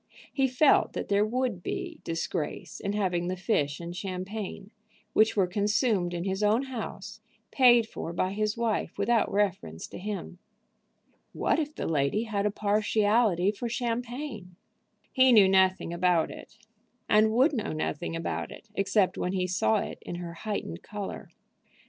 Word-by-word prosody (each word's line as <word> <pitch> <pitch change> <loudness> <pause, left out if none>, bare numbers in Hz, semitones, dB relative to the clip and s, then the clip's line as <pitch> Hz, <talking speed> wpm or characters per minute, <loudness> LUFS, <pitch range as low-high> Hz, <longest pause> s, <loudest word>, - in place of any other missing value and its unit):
He 270 -1 +2
felt 260 +3 +4
that - - -4
there 200 0 +3
would 235 -3 -1
be 360 - -5
disgrace 165 -1 -4
in 200 - -3
having 180 -4 0
the 185 - -1
fish 150 -7 0
and 170 0 -6
champagne, 195 +2 -5 0.4
which 220 0 +4
were 195 - +4
consumed 205 -1 +1
in 170 - -3
his 190 +1 -2
own 215 +5 +3
house, 260 -4 -7 0.3
paid 240 -4 +5
for 165 - -6
by 185 +2 -1
his 215 +2 -1
wife 230 -2 -1
without 235 -2 +2
reference 170 - -1
to - - -8
him. 190 -2 -5 0.9
What - - +1
if 300 -1 -3
the - - -4
lady 155 +7 +1
had 210 -3 -1
a - - +2
partiality 210 -2 +2
for 230 +3 -5
champagne? 240 -4 -4 0.6
He 260 -1 +6
knew 210 -5 +7
nothing 190 -2 +3
about 175 -1 +2
it, - - -12 0.5
and 215 +1 +4
would 260 +8 +4
know 220 -5 -2
nothing 155 +1 -3
about 165 - -3
it, 225 - -13
except 200 -1 +1
when 180 - -1
he 185 -1 0
saw 185 +4 +1
it - - -4
in - - -6
her 175 -1 -6
heightened 165 - -4
color. 205 -2 -7
205 Hz, 160 wpm, -28 LUFS, 180-225 Hz, 0.9 s, knew